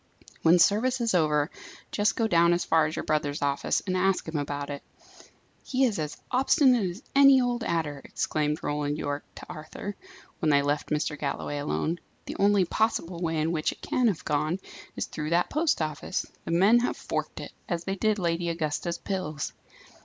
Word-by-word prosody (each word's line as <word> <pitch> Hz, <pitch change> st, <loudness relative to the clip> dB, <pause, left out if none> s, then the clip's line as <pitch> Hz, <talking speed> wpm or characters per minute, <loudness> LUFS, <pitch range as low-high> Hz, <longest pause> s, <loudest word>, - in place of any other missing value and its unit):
"When 165 Hz, +2 st, +6 dB
service 225 Hz, +8 st, +3 dB
is 230 Hz, -3 st, 0 dB
over, 150 Hz, -3 st, +2 dB, 0.4 s
just 205 Hz, 0 st, +1 dB
go 230 Hz, -, +1 dB
down 170 Hz, -3 st, +4 dB
as 175 Hz, -, 0 dB
far 160 Hz, -1 st, +3 dB
as 155 Hz, -, -5 dB
your -, -, -4 dB
brother's 145 Hz, -1 st, 0 dB
office, 140 Hz, -1 st, 0 dB
and 185 Hz, -2 st, -1 dB
ask 185 Hz, 0 st, +1 dB
him 160 Hz, -, -5 dB
about 145 Hz, 0 st, -3 dB
it." 140 Hz, -, -5 dB, 0.8 s
"He 265 Hz, 0 st, 0 dB
is 215 Hz, -7 st, 0 dB
as 150 Hz, -1 st, -4 dB
obstinate 255 Hz, -, +4 dB
as 185 Hz, +9 st, -9 dB
any 275 Hz, -1 st, +8 dB
old 245 Hz, -1 st, 0 dB
adder!" 150 Hz, -7 st, -1 dB
exclaimed 150 Hz, 0 st, -1 dB
Roland 145 Hz, 0 st, -1 dB
Yorke 145 Hz, -1 st, -3 dB
to -, -, -9 dB
Arthur, 160 Hz, +6 st, -7 dB, 0.4 s
when 160 Hz, -, +1 dB
they 140 Hz, -1 st, +4 dB
left 145 Hz, +1 st, -1 dB
Mr. 150 Hz, 0 st, -1 dB
Galloway 145 Hz, 0 st, -3 dB
alone. 160 Hz, +3 st, -1 dB, 0.3 s
"The -, -, -6 dB
only 200 Hz, -1 st, +4 dB
possible 180 Hz, -4 st, 0 dB
way 165 Hz, -2 st, -1 dB
in 155 Hz, +2 st, +1 dB
which 155 Hz, -2 st, 0 dB
it -, -, -14 dB
can 250 Hz, -1 st, +2 dB
have 195 Hz, -7 st, -1 dB
gone, 155 Hz, +4 st, 0 dB, 0.4 s
is -, -, -2 dB
through 155 Hz, -1 st, -5 dB
that 170 Hz, +2 st, +2 dB
post 305 Hz, -, +1 dB
office. 155 Hz, -2 st, -3 dB, 0.2 s
The -, -, -3 dB
men 195 Hz, +8 st, +5 dB
have 245 Hz, -, -1 dB
forked -, -, -4 dB
it; -, -, -7 dB, 0.2 s
as 170 Hz, -2 st, -1 dB
they 195 Hz, +1 st, -2 dB
did 215 Hz, +2 st, +1 dB
Lady 170 Hz, -2 st, 0 dB
Augusta's 165 Hz, +1 st, -2 dB
pills." 185 Hz, -7 st, -4 dB
170 Hz, 190 wpm, -27 LUFS, 150-205 Hz, 0.8 s, any